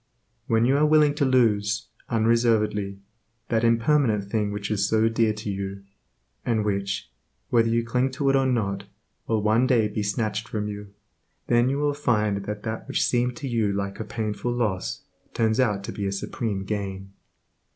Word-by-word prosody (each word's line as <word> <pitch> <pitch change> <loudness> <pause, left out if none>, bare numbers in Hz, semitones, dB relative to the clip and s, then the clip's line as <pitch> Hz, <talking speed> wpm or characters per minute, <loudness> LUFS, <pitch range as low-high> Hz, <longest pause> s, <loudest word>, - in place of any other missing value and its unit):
When 115 0 +3
you 135 +3 +3
are 150 - +4
willing 150 -1 +5
to 145 -1 +1
lose, 110 -4 +2 0.2
unreservedly, 110 -3 +2 0.5
that 110 -1 +1
impermanent 115 -1 +3
thing 105 -2 0
which 105 0 -4
is 100 -1 +1
so 110 0 +3
dear 115 -1 +2
to 105 -1 -5
you, 100 0 -5 0.6
and 110 -2 0
which, 100 -8 -2 0.4
whether 115 -1 +4
you 115 0 +1
cling 125 +3 +1
to 140 +1 -1
it - - +2
or 135 -1 +3
not, 100 -6 -1 0.4
will 110 -2 0
one 110 +4 +3
day 115 -5 +3
be 105 0 -3
snatched 105 +1 -2
from 105 -1 -3
you, 105 -1 -7 0.5
then 120 +1 +3
you 135 - 0
will 145 0 +1
find 105 -8 0
that 105 0 -5
that 110 +2 -4
which 135 - +1
seemed 125 0 +1
to 135 - -5
you 115 -4 +1
like 100 0 -3
a - - -2
painful 110 +2 -3
loss, 110 -6 -2 0.3
turns 110 +1 +1
out 105 -6 +1
to - - -5
be 100 -1 -3
a - - -1
supreme 100 0 -3
gain. 95 -1 -4
110 Hz, 180 wpm, -25 LUFS, 100-120 Hz, 0.6 s, willing